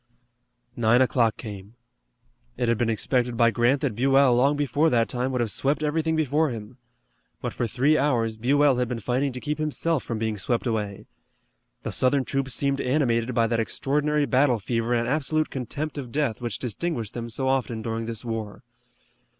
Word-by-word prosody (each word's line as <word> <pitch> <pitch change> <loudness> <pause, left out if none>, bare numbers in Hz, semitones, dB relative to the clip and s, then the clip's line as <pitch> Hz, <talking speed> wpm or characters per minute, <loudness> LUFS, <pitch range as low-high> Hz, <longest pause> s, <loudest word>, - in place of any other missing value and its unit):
Nine 120 +1 +3
o'clock 120 -3 +2
came. 105 -1 -9 0.8
It 120 - 0
had 115 -2 +1
been 120 - +1
expected 120 +2 0
by 115 -1 +4
Grant 120 +4 +2
that 140 -6 0
Buell 135 +1 +4
long 135 +4 +3
before 145 +2 +2
that 115 -4 +2
time 125 +1 -2
would 125 -2 0
have 115 -3 -1
swept 145 +7 0
everything 160 +1 0
before 155 0 +1
him. 115 0 -8 0.6
But - - -4
for 120 - -2
three 140 +7 +2
hours 120 -6 +1
Buell 135 +4 +3
had 125 0 0
been 120 -1 -3
fighting 130 +5 0
to 125 - -5
keep 150 +3 -3
himself 155 0 0
from 115 - -4
being 110 -1 -2
swept 120 +6 -1
away. 105 -3 -3 0.8
The - - -3
Southern 130 +1 +2
troops 135 -1 -2
seemed 140 -1 0
animated 125 -3 +1
by 115 - +3
that 115 0 0
extraordinary 150 +5 0
battle 130 -2 +3
fever 115 +3 -1
and 120 0 0
absolute 155 +3 0
contempt 140 +4 -4
of 125 -4 -7
death 140 -5 -1
which 120 -4 -3
distinguished 125 - -3
them 115 -1 -5
so 130 +4 -2
often 125 -4 -1
during 115 0 -3
this 115 +1 -6
war. 110 -3 -5
125 Hz, 180 wpm, -25 LUFS, 115-140 Hz, 0.8 s, by